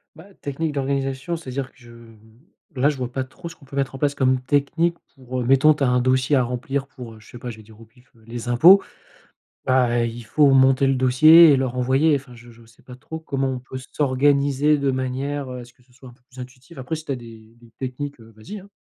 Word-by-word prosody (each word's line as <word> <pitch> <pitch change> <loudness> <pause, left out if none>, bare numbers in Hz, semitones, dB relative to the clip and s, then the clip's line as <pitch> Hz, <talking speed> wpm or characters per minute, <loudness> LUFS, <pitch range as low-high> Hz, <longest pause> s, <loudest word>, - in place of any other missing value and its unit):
Bah, 160 - -14 0.2
technique 145 +2 -3
d'organisation 135 +3 -2
c'est-à-dire 135 -4 -6
que - - -30
je 120 -2 -16 0.8
là, 135 +3 +2
je 145 - -4
vois 125 -2 -4
pas 130 0 -3
trop 170 +7 -11
ce - - -13
qu'on 145 - -22
peut 135 - -12
mettre 135 -1 -2
en - - -6
place 145 +1 0
comme 130 -1 +1
technique 145 +6 0 0.2
pour, 130 -1 -6
heu, - - -3
mettons 135 +4 +5
tu 145 - -3
as - - +3
un 125 0 +2
dossier 130 +3 +1
à 130 - +3
remplir 135 +3 -4
pour, 120 -5 -11
heu, 110 - -15
je 105 - -19
sais 120 - -11
pas, 125 0 -7
je 110 - -9
vais 110 - -14
dire 110 +1 -18
au 115 - -14
pif, 125 +3 -26
heu, 110 - -23
les 120 +1 -7
impôts. 175 +11 +7 0.8
Bah, 125 -2 +2
il 115 0 -6
faut 140 +6 +3
monter 135 0 +4
le 135 - +2
dossier 155 +6 +7
et 135 - +4
leur 130 -1 -2
envoyer. 135 +5 +2
Enfin 130 -3 -8
je 120 0 -15
je 115 0 -18
sais 115 - -24
pas 125 - -12
trop 160 +5 -9
comment 135 -4 -2
on 130 - -4
peut 130 +1 -9
s'organiser 140 +1 +2
de 140 -1 0
manière 130 +2 -3
à 125 -1 -7
ce 120 - -20
que 125 - -30
ce 125 - -31
soit 130 +1 -16
un - - -16
peu 125 - -28
plus 130 -2 -14
intuitif. 130 +5 -12
Après 130 +5 -4
si 155 - -8
tu - - -5
as - - -1
des 115 -1 -14
des 120 -1 -20
techniques, 135 +1 -6
heu, 115 0 -16
vas-y 155 - -9
hein! 200 +2 -16
130 Hz, 260 wpm, -22 LUFS, 125-140 Hz, 0.8 s, impôts